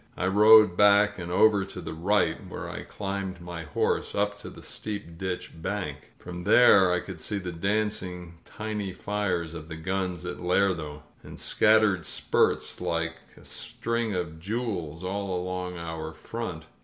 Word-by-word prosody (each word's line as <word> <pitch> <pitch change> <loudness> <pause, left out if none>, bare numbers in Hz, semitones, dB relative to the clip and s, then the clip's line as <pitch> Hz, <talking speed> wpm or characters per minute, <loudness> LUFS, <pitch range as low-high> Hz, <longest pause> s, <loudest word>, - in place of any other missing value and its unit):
I - - -1
rode 105 0 +7
back 105 0 +5
and 85 0 -5
over 100 +2 +5
to 95 -1 -8
the 85 - -6
right, 95 +5 +1
where - - -6
I - - -6
climbed 100 -2 -4
my 85 -1 -7
horse 75 - -1
up 105 0 +1
the - - -10
steep 100 -6 -5
ditch 90 +1 -4
bank. 100 +2 -4
From 90 0 -8
there 100 -3 +7
I 90 - +2
could 95 -4 -8
see 105 +5 -3
the 90 -2 -4
dancing 90 -2 -2
tiny 105 -3 -4
fires 90 -5 -2
of 80 -2 -8
the 80 - -6
guns 90 +1 -3
at 90 - -5
Lerdo, 90 -5 0 0.2
and - - -11
scattered 105 -6 +3
spurts - - +1
like 85 0 -1 0.2
a - - -16
string 115 -3 -2
of 85 -3 -3
jewels 95 -5 -3
all 95 -1 -2
along 90 0 -4
our 80 -1 -5
front. 90 -9 -6
95 Hz, 155 wpm, -27 LUFS, 85-105 Hz, 0.2 s, rode